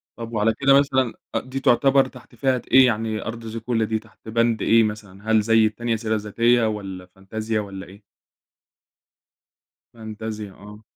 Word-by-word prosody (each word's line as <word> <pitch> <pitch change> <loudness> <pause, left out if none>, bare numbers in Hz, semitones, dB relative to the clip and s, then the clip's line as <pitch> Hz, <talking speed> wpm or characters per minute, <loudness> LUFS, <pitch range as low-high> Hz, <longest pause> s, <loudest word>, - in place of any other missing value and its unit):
طَب 115 0 -8
وعلى 110 +1 +2
كده 140 0 +6
مثلًا 130 -4 +1 0.2
أ - - +3
دي 130 +1 -6
تُعتبر 135 +2 +4
تحت 125 -1 -15
فئة 130 0 0
إيه 130 0 +8
يعني 110 -2 -1
أرض 115 0 -6
زيكولا 115 0 -2
دي 110 0 -1
تحت 110 0 -22
بند 115 -1 +1
إيه 115 0 +4
مثلًا، 105 0 -5
هل 110 -1 +5
زي 115 0 +4
التانية 115 +2 -1
سيرة 110 0 -2
ذاتية، 115 +3 +2
والَّا 95 -4 -5
فانتازيا 110 +4 -4
والَّا 100 -2 -7
إيه؟ 100 +3 -15 1.9
فانتازيا 110 -2 -7
آه، 105 +2 -13
110 Hz, 160 wpm, -23 LUFS, 105-120 Hz, 1.9 s, إيه